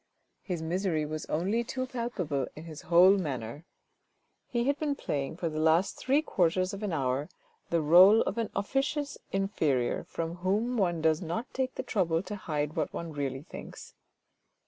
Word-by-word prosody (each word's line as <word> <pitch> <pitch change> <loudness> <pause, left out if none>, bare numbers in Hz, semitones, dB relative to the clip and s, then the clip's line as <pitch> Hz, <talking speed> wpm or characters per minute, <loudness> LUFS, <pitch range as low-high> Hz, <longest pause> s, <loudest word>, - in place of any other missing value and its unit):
His 175 -4 -4
misery 170 -2 0
was 155 +1 -5
only 195 +9 0
too 255 +2 -3
palpable 190 - -2
in 155 - -9
his 160 -2 -9
whole 185 +3 +7
manner. 135 -2 -4 0.8
He 235 -1 0
had 280 +3 0
been 295 -2 0
playing, 145 - -3
for 175 - -2
the 155 -1 -3
last 160 +4 +3
three 280 +4 +1
quarters 185 - +1
of 200 - -6
an 210 -3 -2
hour, 140 0 -1 0.4
the 170 -1 +2
role 185 +8 +8
of 230 - -1
an 225 - -1
officious 280 +8 -1
inferior 160 -11 0
from 165 +1 -4
whom 205 +7 0
one 175 -7 0
does 160 +1 +3
not 175 +8 -4
take 260 0 -2
the - - -3
trouble 175 -8 0
to 200 +2 -6
hide 150 -5 -3
what 155 - -1
one 170 -2 -6
really 135 -2 -3
thinks. - - -10
175 Hz, 170 wpm, -29 LUFS, 155-215 Hz, 0.8 s, role